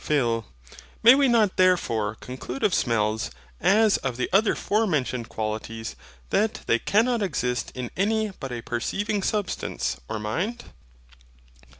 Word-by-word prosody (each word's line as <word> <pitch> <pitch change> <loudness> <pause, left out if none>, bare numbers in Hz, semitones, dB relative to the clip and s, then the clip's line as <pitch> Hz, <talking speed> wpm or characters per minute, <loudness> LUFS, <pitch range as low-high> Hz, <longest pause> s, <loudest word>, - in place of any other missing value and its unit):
PHIL. 120 -7 +1 0.6
May 235 +3 +10
we 275 0 +4
not 225 -5 +3
therefore 115 - +2
conclude 130 +2 -7
of 190 - +3
smells, 110 -1 +1 0.3
as 205 +4 +4
of 130 -3 -4
the 125 - -2
other 205 +3 +4
forementioned 145 - 0
qualities, 110 +1 -4 0.4
that 215 +1 +1
they 115 - +2
cannot 230 - +2
exist 125 -10 -1
in 125 -2 -5
any 215 +2 +1
but 135 -2 -5
a 120 -2 -5
perceiving 200 - -2
substance 205 0 -2
or - - -2
mind? 180 - -3
150 Hz, 130 wpm, -25 LUFS, -, 0.6 s, May